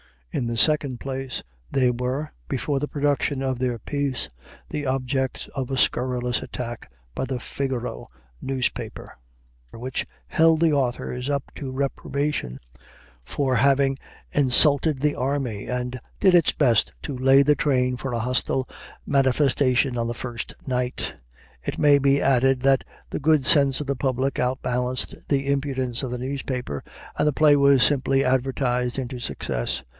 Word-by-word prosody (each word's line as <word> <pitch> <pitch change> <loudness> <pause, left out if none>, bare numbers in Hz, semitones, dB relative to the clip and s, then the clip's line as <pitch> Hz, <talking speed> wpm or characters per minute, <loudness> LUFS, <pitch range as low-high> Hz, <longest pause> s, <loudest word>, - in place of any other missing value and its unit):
In 120 - -1
the 115 0 -3
second 135 +1 +2
place, 135 -1 -4 0.3
they 125 -2 +2
were, 125 +5 -3 0.2
before 140 - -1
the 150 - -2
production 145 -1 0
of 130 -2 -1
their 125 -2 -1
piece, 140 - -2 0.4
the 150 -1 -3
objects 130 0 -1
of 135 -4 -4
a 135 - -2
scurrilous 125 -1 0
attack 120 - -6 0.2
by - - -2
the 130 -1 -3
"Figaro" 125 0 -4 0.3
newspaper, 125 -4 -3 0.6
which 125 +2 -4 0.2
held 160 0 +3
the 165 -2 +4
authors 125 -1 -1
up 140 -1 -2
to 135 -3 -5
reprobation 140 - -2 0.7
for 130 - 0
having 135 +2 +3 0.3
"insulted 140 +1 +4
the 150 0 +2
army," 130 -5 -2
and 125 0 -3 0.2
did 190 - +5
its 170 -3 +5
best 120 -7 +2
to 140 - -4
lay 135 +2 +5
the 150 +2 +4
train 125 -4 +1
for 130 +1 -4
a 120 - -1
hostile 125 +2 0 0.4
manifestation 135 -1 +2
on 115 0 -1
the 120 - -3
first 120 -1 -5
night. 125 -1 -2 0.4
(It - - -4
may 145 -1 +5
be 140 0 +3
added 135 -1 +3
that 135 0 +3 0.2
the - - -3
good 155 -2 +3
sense 140 -2 +5
of - - -4
the 140 -1 -2
public 130 +1 -1
outbalanced 125 0 -2
the 140 -1 0
impudence 130 -3 -1
of 130 - -2
the 125 - -3
newspaper, 130 - -4 0.4
and - - +3
the 150 - +2
play 150 0 +5
was 140 -3 +5
simply 135 0 +3
advertised 125 -1 0
into 130 -1 -4
success.) - - -3
130 Hz, 150 wpm, -24 LUFS, 125-140 Hz, 0.7 s, did